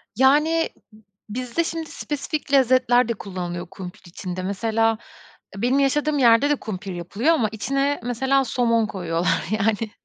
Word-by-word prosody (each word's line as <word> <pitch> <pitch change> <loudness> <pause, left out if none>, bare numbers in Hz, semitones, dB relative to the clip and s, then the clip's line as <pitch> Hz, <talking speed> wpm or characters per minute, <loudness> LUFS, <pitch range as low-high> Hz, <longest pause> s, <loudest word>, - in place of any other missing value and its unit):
Yani, 300 +7 +3 0.3
b 215 - -19 0.3
bizde 250 +8 -2
şimdi 325 -1 -4
spesifik 295 0 -4
lezzetler 255 -2 +4
de 235 - 0
kullanılıyor 180 -4 -6
kumpir 180 -1 -9
içinde. 180 +1 -6
Mesela, 225 +3 +1 0.6
eee, 195 - -7
benim 250 +4 +2
yaşadığım 295 +2 +1
yerde 235 +2 +5
de 295 - +3
kumpir 200 -6 -6
yapılıyor 200 - 0
ama 235 -10 +1
içine 275 +6 -1
mesela 265 +3 +1
somon 230 -2 +1
koyuyorlar 175 -3 -1
yani. 215 +1 0
235 Hz, 145 wpm, -23 LUFS, 200-275 Hz, 0.6 s, yerde